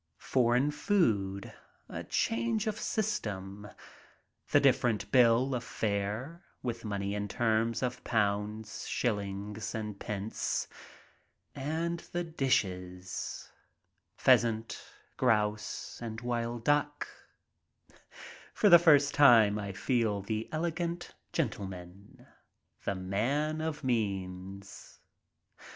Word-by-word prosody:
Foreign 125 +3 +2
food 110 - 0 0.2
— - - -37
a - - -6
change 115 - 0
of 215 0 -2
system 105 - -3 0.4
— - - -31
the - - +6
different 115 -4 +2
bill 125 +1 +5
of 125 -1 -2
fare, 110 - -3 0.2
with 115 -2 -3
money 100 -2 -2
in 105 0 -2
terms 115 +2 +1
of 125 -1 -2
pounds, 105 0 -1
shillings, 105 -1 -2
and 105 -2 -4
pence. 105 +1 -2 0.9
And 160 +5 -2
the 175 0 0
dishes 90 - -2 0.3
— - - -48
pheasant, 115 -1 +3 0.3
grouse, 105 -3 0
and 110 -2 -5
wild 120 -1 -2
duck. 145 0 +1 1.5
For 210 - +4
the 175 -2 +10
first 145 -4 +5
time 115 -7 +6
I 100 -1 -4
feel 105 -1 0
the 110 +2 -3
elegant 170 +2 -2 0.2
gentleman, 95 0 -5 0.6
the 100 - 0
man 130 +12 -1
of 155 -1 -3
means. 100 -4 -3
115 Hz, 105 wpm, -31 LUFS, 100-140 Hz, 1.5 s, the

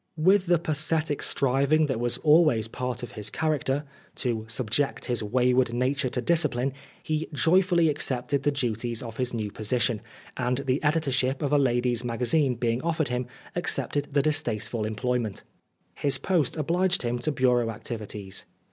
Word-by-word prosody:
With 185 +4 +4
the 175 0 +4
pathetic 155 -1 -2
striving 140 +3 +2
that 130 -6 -2
was 120 0 +1
always 150 -8 +4
part 125 +1 -4
of 120 - -6
his 105 -2 -5
character, 150 -3 -1 0.3
to 115 -4 -2
subject 120 +4 -1
his 120 -2 +1
wayward 125 +2 +2
nature 130 +1 0
to 125 - -2
discipline, 140 -5 +1 0.3
he 155 0 -2
joyfully 170 +2 +3
accepted 140 -2 0
the 145 - +2
duties 120 -4 -2
of 115 -2 -8
his 125 -1 +1
new 110 -3 -3
position; 115 +1 -1 0.3
and 125 0 0
the 135 0 -1
editorship 140 -3 +1
of 145 0 0
a 145 - +5
ladies' 120 -2 +1
magazine 125 +3 +1
being 115 0 0
Oscar - - -9
Wilde - - +1
offered 155 -3 0
him, 125 0 -2 0.3
accepted 145 -4 0
the 140 -1 +2
distasteful 120 -7 0
employ 125 +4 -1
ment. 110 -5 -5 0.5
His 140 -2 0
post 160 0 0
obliged 175 +4 +1
him 120 0 -1
to 155 +6 -1
bureau 125 -3 +2
activities. 105 -3 -5
130 Hz, 165 wpm, -26 LUFS, 120-150 Hz, 0.5 s, a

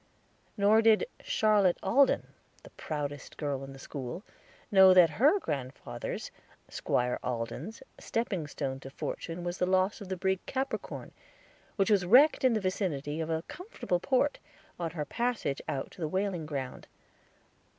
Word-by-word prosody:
Nor 210 +2 +5
did 225 -1 +5 0.2
Charlotte 205 -4 +3
Alden, 260 +9 +3 0.3
the - - -14
proudest 145 -2 -5
girl 140 -3 -2
in 135 0 -9
school, 135 +5 -6 0.5
know 190 -2 +8
that 175 -3 +7
her 300 +9 +6
grandfather's, 140 - -5 0.4
Squire 125 0 -1
Alden's, 125 - -4 0.2
stepping 195 -9 -2
stone 135 -2 -4
to 135 - -9
fortune 165 +5 -5
was 175 +1 -4
the 180 - +2
loss 185 +3 +1
of 195 - -8
the 190 - -2
brig 190 0 0
Capricorn, 270 +1 -4 0.6
which 195 +1 +2
was 200 -3 +4
wrecked 260 - +6
in 255 -2 +5
the 220 - +1
vicinity 165 -6 -2
of 160 - -3
a 160 0 -1
comfortable 360 - -3
port, 275 +7 +1 0.4
on 170 -1 -1
her 155 -2 -4
passage 235 - -1
out 135 -1 -3
to 180 - -13
the 160 - 0
whaling 185 -2 -2
ground. 135 -4 -5
180 Hz, 150 wpm, -30 LUFS, 145-215 Hz, 0.6 s, know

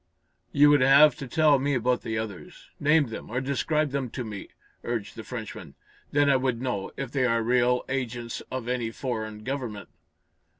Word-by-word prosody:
"You 145 +1 +6
would 145 -2 +5
have 140 +3 +7
to 135 - -6
tell 150 0 +4
me 140 +1 0
about 125 0 +1
the 110 0 -3
others. 110 -4 -7
Name 150 -2 +3
them, 110 - -7
or 120 +3 -1
describe 145 +2 0
them 135 -2 -2
to 125 - -5
me," 105 -3 -7 0.4
urged 115 -4 -4
the - - -7
Frenchman. - - -8 0.4
"Then 145 0 +3
I 140 -1 +5
would 130 -3 -1
know, 125 -6 -3
if 135 -3 -4
they 135 -2 +1
are 115 -1 +1
real 125 +1 +2
agents 120 -3 -3
of 130 -2 -5
any 125 -2 -1
foreign 110 -3 -5
government." 125 -6 -5
125 Hz, 180 wpm, -26 LUFS, 115-140 Hz, 0.4 s, have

